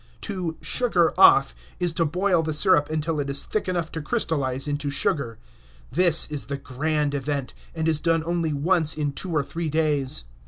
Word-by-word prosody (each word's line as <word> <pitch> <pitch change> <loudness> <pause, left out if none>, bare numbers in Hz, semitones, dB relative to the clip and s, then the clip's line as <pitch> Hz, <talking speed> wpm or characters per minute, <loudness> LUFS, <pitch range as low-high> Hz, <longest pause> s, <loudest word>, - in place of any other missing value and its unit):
To 180 -5 -4
"sugar 185 -10 +1
off" 60 - +6 0.3
is 175 -2 0
to 165 0 +1
boil 180 +2 +1
the 155 -1 -3
sirup 150 -3 +3
until 155 0 -2
it 140 -1 -2
is 140 0 +3
thick 215 -3 -2
enough 170 -3 -2
to 160 - -5
crystallize 140 -3 -2
into 145 0 -2
sugar. 140 - -1 0.5
This 175 -2 +4
is 145 -2 -4
the 140 0 -4
grand 145 +2 -2
event, 140 -1 -3 0.2
and 160 0 -1
is 160 -2 +2
done 165 0 +1
only 170 -2 -1
once 160 +2 +1
in 145 -2 -1
two 180 +6 -5
or 150 -3 +1
three 165 +3 -4
days. 145 - 0
155 Hz, 185 wpm, -24 LUFS, 145-170 Hz, 0.5 s, off